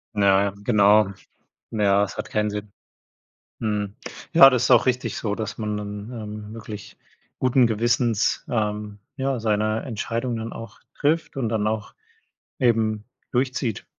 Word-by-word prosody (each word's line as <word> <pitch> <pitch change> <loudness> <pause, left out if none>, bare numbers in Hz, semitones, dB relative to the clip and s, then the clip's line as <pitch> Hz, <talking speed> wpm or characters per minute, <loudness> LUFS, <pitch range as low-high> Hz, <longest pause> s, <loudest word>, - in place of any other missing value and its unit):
Ja, 100 -1 +4
ja, 100 - -2
genau. 105 -2 +5 0.6
Na 110 -2 -1
ja, 100 0 +4
es 100 - -5
hat - - -5
keinen 105 -1 0
Sinn. 105 0 -6 0.9
Mhm. 105 -2 -2 0.4
Ja, 135 - +10
das 125 -2 +1
ist - - +2
auch 120 0 +6
richtig 125 0 0
so, 105 -2 -2
dass 110 -2 -5
man 105 -1 -2
dann, 105 +2 -6
ähm, 105 -2 -7
wirklich 105 -2 -9 0.4
guten 130 -1 +4
Gewissens, 115 0 +1
ähm, 105 -2 -2 0.2
ja, 135 -1 -1
seine 110 0 0
Entscheidung 115 0 -3
dann 115 0 -5
auch 115 -2 -10 0.2
trifft 155 -1 0
und 115 -5 -1
dann 110 -2 0
auch 110 -1 -3 0.7
eben 110 -4 +1 0.3
durchzieht. 125 -3 -1
110 Hz, 150 wpm, -24 LUFS, 105-120 Hz, 0.9 s, Ja